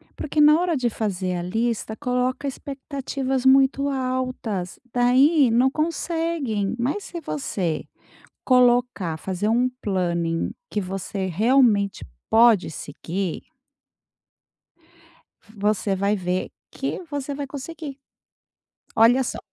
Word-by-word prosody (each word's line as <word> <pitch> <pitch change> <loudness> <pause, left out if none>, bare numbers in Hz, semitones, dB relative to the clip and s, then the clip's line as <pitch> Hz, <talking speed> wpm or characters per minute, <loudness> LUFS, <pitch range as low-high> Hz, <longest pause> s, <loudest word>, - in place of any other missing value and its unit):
Porque 300 +1 -3
na 300 +1 +7
hora 350 -4 +1
de 245 -2 +1
fazer 190 -5 -2
a 175 - -2
lista 220 +4 -2
coloca 255 +1 -1
expectativas 270 -1 -4
muito 270 +1 +4
altas, 255 -8 -3
daí 255 +2 +4
não 245 +3 +4
conseguem, 315 - -1
mas 290 +12 -1
se 345 - -7
você 160 - -3 0.6
colocar, 245 -9 +3
fazer 190 +5 -2
um 245 +2 +2
planning 170 -4 -1 0.2
que 210 - -1
você 195 +1 -4
realmente 210 +1 +2 0.2
pode 225 -7 +5
seguir 170 +5 -5 2.1
você 205 -1 0
vai 200 +2 +1
ver 180 -1 -2 0.2
que - - -3
você 285 -1 -3
vai 285 0 -4
conseguir. 285 0 -7 1.0
Olha 240 +4 +6
só! - - -4
245 Hz, 110 wpm, -23 LUFS, 195-275 Hz, 2.1 s, na